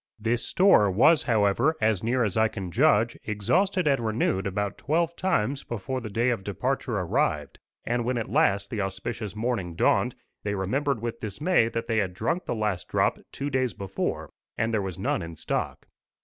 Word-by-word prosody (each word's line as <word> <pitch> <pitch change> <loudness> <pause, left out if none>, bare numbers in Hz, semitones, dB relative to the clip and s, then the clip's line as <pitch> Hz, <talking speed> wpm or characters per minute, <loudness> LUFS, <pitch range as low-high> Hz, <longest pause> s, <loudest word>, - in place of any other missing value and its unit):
This 115 +2 0
store 180 - +4
was, 135 - +5
however, 110 +7 +2
as 110 -5 +1
near 125 +2 +1
as 105 -5 -1
I 110 0 +4
can 95 -5 -6
judge, 115 - +3
exhausted 180 - +1
and 140 -5 +2
renewed 110 -3 0
about 100 0 -2
twelve 165 +3 0
times 140 - 0
before 120 +3 -4
the 110 - -6
day 115 +4 +1
of 115 -5 -2
departure 115 +4 -2
arrived; 80 -5 -1 0.3
and 120 0 0
when 125 +1 -1
at 115 - -2
last 100 0 +2
the 110 - -1
auspicious 95 +2 -4
morning 110 -7 -2
dawned, - - +2 0.3
they 100 0 -2
remembered 125 +6 -1
with 115 0 -3
dismay 115 - +1
that 115 0 -3
they 115 -1 -1
had 95 -4 0
drunk 120 - -1
the - - -2
last 105 -5 -2
drop - - +1
two 140 +1 -4
days 130 -3 0
before, 95 -1 -3 0.3
and 115 +1 0
there 110 - +2
was 95 -3 -5
none 95 0 -1
in 85 -1 -7
stock. - - -3
110 Hz, 185 wpm, -26 LUFS, 100-125 Hz, 0.3 s, was